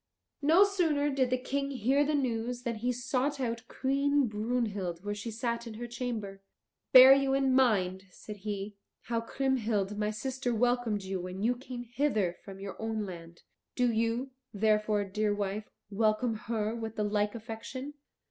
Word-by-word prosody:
No 325 +7 +6
sooner 320 -8 +1
did 265 -2 +1
the 255 - +2
King 275 +2 -2
hear 270 +2 +2
the 300 +1 +1
news 245 -2 -1
than 235 -2 -2
he 245 +3 0
sought 260 +3 -1
out 235 -1 -3
Queen 280 +1 +1
Brunhild 210 -5 -2
where 205 - -1
she 205 +3 -5
sat 235 +1 -3
in 220 - -7
her 240 +2 -5
chamber. 230 -5 -5 0.5
"Bear 260 +1 +11
you 270 0 +2
in 270 -1 +2
mind," 195 -8 +2
said 210 +3 -10
he, 205 0 -4 0.3
"how 230 -1 -2
Kriemhild 225 -5 -1
my 210 0 +1
sister 250 +2 -2
welcomed 240 -3 +1
you 190 -1 -3
when 185 +2 -5
you 245 +2 +2
came 245 -1 -7
hither 230 -7 0
from 195 -1 -10
your 195 +2 -7
own 220 -1 -2
land. 170 -2 -10 0.3
Do 250 -1 +2
you, 230 +4 0 0.2
therefore, 210 0 +2
dear 205 +1 0
wife, 205 +1 -3 0.2
welcome 215 +3 +1
her 220 0 -2
with 225 -1 -5
the 210 - -1
like 210 +1 0
affection." 235 +5 -7
230 Hz, 165 wpm, -30 LUFS, 210-260 Hz, 0.5 s, Bear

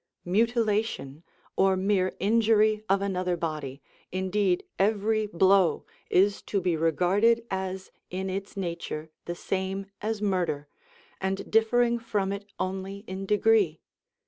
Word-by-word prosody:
Mutilation, 215 - 0 0.3
or 190 0 +3
mere 185 -1 +1
injury 215 0 +3
of 195 0 +3
another 185 -2 -1
body, 150 -5 -4 0.3
indeed 190 0 0 0.2
every 215 +2 +2
blow, 190 -1 +3 0.2
is 200 +2 +3
to 200 - -1
be 180 -2 0
regarded 190 +9 +2
as 190 0 -4 0.2
in 190 +1 -3
its 195 +1 -5
nature 170 -4 -4
the 175 - -4
same 190 +2 -3 0.2
as 220 0 -2
murder, 180 -8 -1 0.5
and 195 +1 -2
differing 235 +2 +3
from 205 -4 -1
it 200 0 -6
only 195 +1 -4
in 190 0 -6
degree. 210 -6 +3
195 Hz, 120 wpm, -27 LUFS, 185-210 Hz, 0.5 s, or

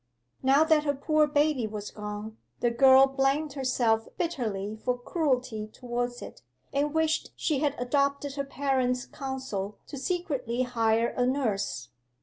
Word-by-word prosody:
'Now 270 +3 +5
that 315 -2 +3
her 285 -1 0
poor 305 +2 +2
baby 290 -5 +2
was 210 -1 -6
gone, 210 +1 -6 0.2
the 240 - +2
girl 265 +2 +7
blamed 270 +2 0
herself 245 -5 +1
bitterly 220 - -2
for 250 0 0
cruelty 250 -6 -1
towards 245 +1 -4
it, - - -10 0.3
and 285 +1 +1
wished 320 0 +1
she 300 -4 0
had 290 -1 0
adopted 280 +2 0
her 280 0 -2
parents' 265 -2 0
counsel 260 -8 -5
to 280 - -7
secretly 270 -8 -1
hire 230 -2 +1
a 250 0 0
nurse. 215 - -1
260 Hz, 140 wpm, -28 LUFS, 235-285 Hz, 0.3 s, girl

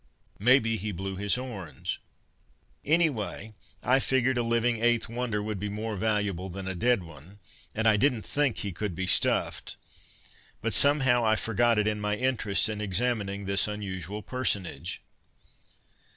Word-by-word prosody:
Maybe 115 0 +4
he 105 +2 -3
blew 95 +1 -5
his 100 +1 +1
horns. 115 -11 -5 0.8
Anyway, 120 - 0 0.3
I 130 +2 +4
figured 130 -1 +2
a 120 - +1
living 115 0 +1
Eighth 120 -1 +3
Wonder 115 -3 -2
would 105 -2 -4
be 105 +2 -3
more 105 +1 -4
valuable 105 -3 -1
than 95 +1 -7
a 95 - -2
dead 115 +2 +2
one; 85 +4 -14 0.4
and 110 +1 +1
I 110 -1 +5
didn't 120 -4 +1
think 135 - +1
he 100 - -2
could 95 +1 -4
be 95 +2 -2
stuffed. - - +1 0.8
But 115 0 -1
somehow 135 -4 +3
I 110 -1 +3
forgot 115 +1 +2
it 105 0 +2
in 105 -1 -1
my 105 0 0
interest 110 -5 +2
in 105 -1 -3
examining 100 -1 -1
this 100 0 +2
unusual 100 -1 -5
personage. 100 -9 -2
105 Hz, 150 wpm, -28 LUFS, 100-120 Hz, 0.8 s, I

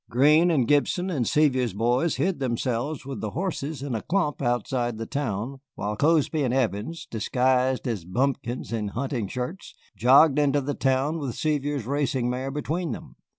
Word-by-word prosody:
Greene 150 +7 +5
and 135 -8 +2
Gibson 175 +6 +2
and 130 -9 0
Sevier's 130 -7 +2
boys 120 +9 +1
hid 185 -3 0
themselves 130 +3 -2
with 135 -1 -6
the 110 - -2
horses 155 - -3
in 140 -3 -3
a 110 - -2
clump 175 -7 -1
outside 120 -1 -1
the 115 - -4
town, 130 0 -3 0.2
while 105 +1 -3
Cozby 155 +3 +2
and 130 -4 +1
Evans, 125 +4 -1
disguised 130 +3 +1
as 110 -8 -2
bumpkins 120 +5 -2
in 110 -2 -1
hunting 120 0 -3
shirts, 125 - -6 0.2
jogged 135 +5 +6
into 145 -1 +3
the 140 +1 -2
town 135 +5 0
with 135 -6 -4
Sevier's 145 -4 -1
racing 130 -2 0
mare 130 +2 -3
between 155 +4 -2
them. - - -10
135 Hz, 165 wpm, -25 LUFS, 120-150 Hz, 0.2 s, jogged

